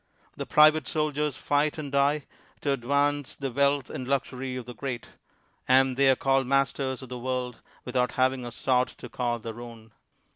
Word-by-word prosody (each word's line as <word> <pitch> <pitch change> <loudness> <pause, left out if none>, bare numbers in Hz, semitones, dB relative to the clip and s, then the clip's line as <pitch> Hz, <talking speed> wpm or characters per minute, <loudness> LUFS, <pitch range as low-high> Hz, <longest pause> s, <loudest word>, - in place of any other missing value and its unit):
The - - -5
private 155 -2 +5
soldiers 150 -2 -1
fight 145 +2 +1
and 145 -3 -5
die, 140 +1 +2 0.4
to 145 - 0
advance 140 +2 0
the 135 -2 -4
wealth 140 +1 +2
and 130 - -5
luxury 130 -1 -2
of 125 -2 -5
the 125 - -8
great; 125 -1 -5 0.6
and 130 0 +4
they 135 +1 +4
are 130 - +5
called 135 0 +1
masters 135 -1 0
of 130 - -10
the 125 -1 -6
world, 125 -1 -3 0.2
without 125 0 0
having 130 0 +1
a 120 - -5
sod 125 +1 +1
to - - -11
call 120 -1 -1
their 115 +1 -7
own. 115 -2 -11
130 Hz, 180 wpm, -27 LUFS, 125-140 Hz, 0.6 s, private